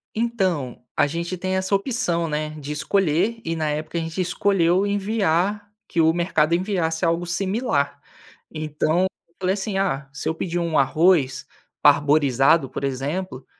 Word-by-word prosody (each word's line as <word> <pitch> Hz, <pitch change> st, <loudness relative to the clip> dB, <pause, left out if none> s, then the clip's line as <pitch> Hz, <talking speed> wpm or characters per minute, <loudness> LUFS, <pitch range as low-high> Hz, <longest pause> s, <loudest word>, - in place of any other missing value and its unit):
Então, 190 Hz, -, -1 dB
a -, -, +4 dB
gente 170 Hz, +4 st, -4 dB
tem 185 Hz, +1 st, -2 dB
essa 190 Hz, +1 st, +1 dB
opção, 195 Hz, -6 st, 0 dB
né, 155 Hz, 0 st, -2 dB
de 145 Hz, 0 st, -6 dB
escolher, 175 Hz, +7 st, +1 dB
e 165 Hz, 0 st, -1 dB
na 155 Hz, -2 st, -1 dB
época 155 Hz, +3 st, -3 dB
a -, -, 0 dB
gente 165 Hz, +2 st, -5 dB
escolheu 180 Hz, 0 st, +2 dB
enviar, 205 Hz, -1 st, 0 dB, 0.2 s
que 170 Hz, -, +1 dB
o 160 Hz, 0 st, +5 dB
mercado 170 Hz, -2 st, +1 dB
enviasse 175 Hz, -2 st, 0 dB
algo 170 Hz, +1 st, +1 dB
similar. 185 Hz, -, -1 dB, 0.5 s
Então, 155 Hz, +2 st, 0 dB, 0.3 s
eu 170 Hz, -, -38 dB
falei 185 Hz, 0 st, +1 dB
assim: 195 Hz, 0 st, -3 dB
"Ah, 145 Hz, -8 st, -1 dB
se 145 Hz, -, -6 dB
eu 160 Hz, -, 0 dB
pedir 175 Hz, 0 st, -2 dB
um 165 Hz, -2 st, 0 dB
arroz 140 Hz, -3 st, +3 dB, 0.4 s
parboilizado 145 Hz, 0 st, +4 dB
por -, -, -6 dB
exemplo, 140 Hz, +4 st, -3 dB
170 Hz, 155 wpm, -23 LUFS, 150-190 Hz, 0.5 s, o